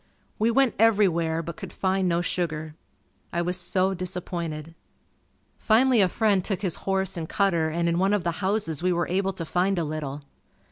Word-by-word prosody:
We 220 Hz, +2 st, +3 dB
went 260 Hz, +1 st, +3 dB
everywhere 175 Hz, -7 st, +3 dB
but 170 Hz, 0 st, -7 dB
could -, -, -8 dB
find 190 Hz, -1 st, 0 dB
no 170 Hz, 0 st, +1 dB
sugar. 160 Hz, -3 st, -3 dB, 0.6 s
I 170 Hz, 0 st, 0 dB
was 180 Hz, +1 st, -1 dB
so 185 Hz, +2 st, 0 dB
disappointed. 175 Hz, -4 st, -4 dB, 0.9 s
Finally 240 Hz, +1 st, +4 dB
a 185 Hz, -, +4 dB
friend 205 Hz, -2 st, +2 dB
took 195 Hz, 0 st, -3 dB
his 180 Hz, -4 st, 0 dB
horse 190 Hz, -1 st, 0 dB
and 160 Hz, -1 st, -4 dB
cutter 170 Hz, -6 st, +1 dB
and 170 Hz, +2 st, -1 dB
in 170 Hz, +1 st, +1 dB
one 195 Hz, +2 st, +2 dB
of 205 Hz, -4 st, +1 dB
the 170 Hz, -, 0 dB
houses 190 Hz, -6 st, 0 dB
we 180 Hz, +1 st, +2 dB
were 175 Hz, -1 st, 0 dB
able 190 Hz, +2 st, 0 dB
to 170 Hz, -2 st, -5 dB
find 185 Hz, +4 st, +1 dB
a 170 Hz, -, +1 dB
little. 150 Hz, -2 st, -5 dB
180 Hz, 185 wpm, -25 LUFS, 165-195 Hz, 0.9 s, Finally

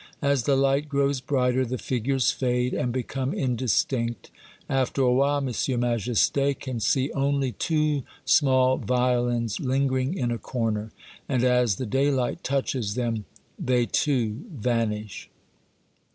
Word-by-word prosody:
As 140 Hz, -4 st, +2 dB
the 140 Hz, -, +3 dB
light 135 Hz, +2 st, +1 dB
grows 140 Hz, -2 st, +1 dB
brighter, 130 Hz, -1 st, +1 dB
the 130 Hz, +1 st, -3 dB
figures 130 Hz, +1 st, 0 dB
fade, 125 Hz, -1 st, 0 dB
and 125 Hz, -, -1 dB
become 130 Hz, -, -3 dB
indistinct. 120 Hz, -, -1 dB, 0.4 s
After 135 Hz, 0 st, 0 dB
a 125 Hz, -1 st, +4 dB
while, 140 Hz, +1 st, +2 dB
M. 125 Hz, 0 st, -1 dB
Majesty 120 Hz, +4 st, +1 dB
can 130 Hz, -3 st, -5 dB
see 130 Hz, +6 st, +1 dB
only 140 Hz, -1 st, 0 dB
two 150 Hz, -, 0 dB, 0.2 s
small 130 Hz, -2 st, +4 dB
violins 120 Hz, -3 st, 0 dB
lingering 135 Hz, +3 st, 0 dB
in 120 Hz, -6 st, -1 dB
a 120 Hz, -, -2 dB
corner, 110 Hz, -4 st, -2 dB, 0.4 s
and 130 Hz, -3 st, +1 dB
as 125 Hz, -4 st, +3 dB
the 130 Hz, -, -4 dB
daylight 135 Hz, +2 st, 0 dB
touches 130 Hz, -6 st, -1 dB
them, 115 Hz, -4 st, -2 dB, 0.3 s
they, 125 Hz, -2 st, +1 dB
too, 120 Hz, -2 st, 0 dB
vanish. 110 Hz, -, -2 dB
130 Hz, 130 wpm, -25 LUFS, 120-135 Hz, 0.4 s, a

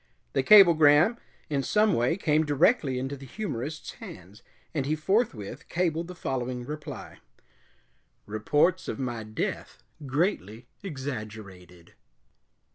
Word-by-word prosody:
The -, -, +2 dB
cablegram 170 Hz, -1 st, +7 dB, 0.3 s
in 140 Hz, -2 st, 0 dB
some 210 Hz, +8 st, +2 dB
way 120 Hz, +8 st, +1 dB
came 155 Hz, -4 st, +2 dB
directly 145 Hz, -, +2 dB
into 135 Hz, +2 st, -3 dB
the 135 Hz, -1 st, -11 dB
humorist's 150 Hz, -, -5 dB
hands, 95 Hz, +4 st, -12 dB, 0.3 s
and 140 Hz, -4 st, -1 dB
he 155 Hz, -, +1 dB
forthwith 155 Hz, -, -1 dB
cabled 170 Hz, -1 st, -1 dB
the 180 Hz, -, -9 dB
following 125 Hz, -4 st, -3 dB
reply: 150 Hz, +2 st, -8 dB, 1.1 s
"Reports 145 Hz, -, +1 dB
of -, -, -3 dB
my 120 Hz, -4 st, -3 dB
death 110 Hz, 0 st, -5 dB, 0.2 s
greatly 130 Hz, -, -1 dB, 0.2 s
exaggerated." 110 Hz, -, -8 dB
145 Hz, 115 wpm, -27 LUFS, 120-170 Hz, 1.1 s, cablegram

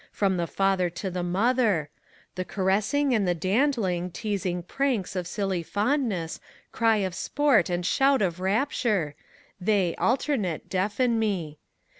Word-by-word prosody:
From 195 Hz, -2 st, +1 dB
the 170 Hz, -1 st, -1 dB
father 195 Hz, -1 st, +1 dB
to 175 Hz, +3 st, -5 dB
the 180 Hz, 0 st, -3 dB
mother: 195 Hz, -, +1 dB, 0.4 s
the 185 Hz, -, -3 dB
caressing 205 Hz, +10 st, +1 dB
and 210 Hz, -5 st, +2 dB
the 175 Hz, -, +2 dB
dandbng. 185 Hz, -, 0 dB
Teasing 185 Hz, -3 st, -2 dB
pranks 245 Hz, -3 st, -1 dB
of 180 Hz, -2 st, -2 dB
silly 195 Hz, -2 st, -2 dB
fondness, 205 Hz, -, -1 dB, 0.3 s
cry 225 Hz, -1 st, +3 dB
of 185 Hz, -, -4 dB
aport 265 Hz, -, +2 dB
and 175 Hz, 0 st, -1 dB
shout 270 Hz, +2 st, +3 dB
of 180 Hz, -2 st, -1 dB
rapture, 200 Hz, -, 0 dB, 0.5 s
They, 190 Hz, -3 st, +1 dB
alternate, 235 Hz, -, 0 dB
deafen 215 Hz, +5 st, +1 dB
me. 180 Hz, -9 st, -2 dB
195 Hz, 135 wpm, -26 LUFS, 180-230 Hz, 0.5 s, cry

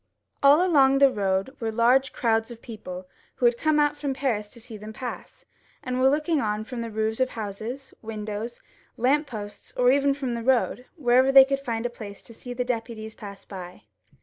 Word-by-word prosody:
All 290 Hz, +6 st, +6 dB
along 275 Hz, -6 st, +5 dB
the 275 Hz, -1 st, +6 dB
road 195 Hz, +4 st, -1 dB
were 225 Hz, -2 st, -2 dB
thick 245 Hz, +4 st, +3 dB
crowds 225 Hz, -1 st, 0 dB
of 235 Hz, -2 st, -10 dB
people 185 Hz, -6 st, -8 dB, 0.3 s
who 245 Hz, -, 0 dB
had 240 Hz, 0 st, +5 dB
come 310 Hz, +4 st, +1 dB
out 295 Hz, 0 st, +3 dB
from 285 Hz, -2 st, -3 dB
Paris 235 Hz, -6 st, -1 dB
to 235 Hz, -, -11 dB
see 230 Hz, -1 st, -8 dB
them 215 Hz, +1 st, -9 dB
pass, 245 Hz, +2 st, -8 dB, 0.4 s
and 255 Hz, 0 st, -2 dB
were 265 Hz, -, +6 dB
looking 305 Hz, +1 st, +1 dB
on 210 Hz, 0 st, -1 dB
from 240 Hz, +1 st, -6 dB
roofs 220 Hz, +1 st, -1 dB
of 260 Hz, 0 st, +2 dB
houses, 225 Hz, +5 st, -6 dB
windows, 220 Hz, +1 st, -5 dB, 0.4 s
lamp 285 Hz, +5 st, +2 dB
posts, 205 Hz, -5 st, -8 dB
or 250 Hz, 0 st, +5 dB, 0.2 s
from 265 Hz, -4 st, -3 dB
the 235 Hz, -, -3 dB
road, 250 Hz, 0 st, +1 dB
wherever 260 Hz, -3 st, +4 dB
they 270 Hz, -1 st, +9 dB
could 275 Hz, 0 st, -1 dB
find 235 Hz, -4 st, -3 dB
a -, -, +1 dB
place 205 Hz, -4 st, -9 dB
to 230 Hz, -, -10 dB
see 245 Hz, +2 st, -9 dB
the 245 Hz, 0 st, -2 dB
deputies 225 Hz, -2 st, -4 dB
pass 200 Hz, -3 st, -10 dB
by. 180 Hz, -2 st, -9 dB
240 Hz, 195 wpm, -25 LUFS, 220-265 Hz, 0.4 s, they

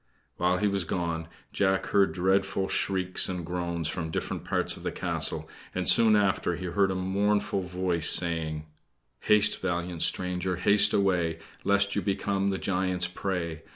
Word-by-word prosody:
While 90 Hz, +1 st, +1 dB
he 105 Hz, -, +1 dB
was 100 Hz, -2 st, 0 dB
gone, 85 Hz, -2 st, -3 dB, 0.3 s
Jack 95 Hz, -1 st, +1 dB
heard 100 Hz, -1 st, +3 dB
dreadful 95 Hz, +1 st, 0 dB
shrieks 95 Hz, -1 st, 0 dB
and 90 Hz, -2 st, -4 dB
groans 85 Hz, -2 st, -3 dB
from 80 Hz, 0 st, -4 dB
different -, -, -4 dB
parts -, -, +1 dB
of -, -, -12 dB
the -, -, -3 dB
castle, -, -, -2 dB, 0.3 s
and -, -, -2 dB
soon 110 Hz, -2 st, +6 dB
after 95 Hz, -3 st, +1 dB
he 90 Hz, +2 st, -6 dB
heard 95 Hz, +2 st, +1 dB
a 95 Hz, -, -2 dB
mournful 100 Hz, +2 st, 0 dB
voice 90 Hz, -2 st, +1 dB
saying: 80 Hz, -3 st, +1 dB, 0.5 s
"Haste, 105 Hz, 0 st, +3 dB
valiant 85 Hz, -2 st, -3 dB
stranger, 90 Hz, 0 st, +1 dB
haste 100 Hz, +4 st, +4 dB
away, 90 Hz, -5 st, +1 dB, 0.3 s
Lest 100 Hz, 0 st, +2 dB
you 100 Hz, -, 0 dB
become 100 Hz, 0 st, -1 dB
the 95 Hz, -, -1 dB
giant's 90 Hz, -2 st, 0 dB
prey. 90 Hz, -3 st, -4 dB
95 Hz, 155 wpm, -27 LUFS, 85-100 Hz, 0.5 s, soon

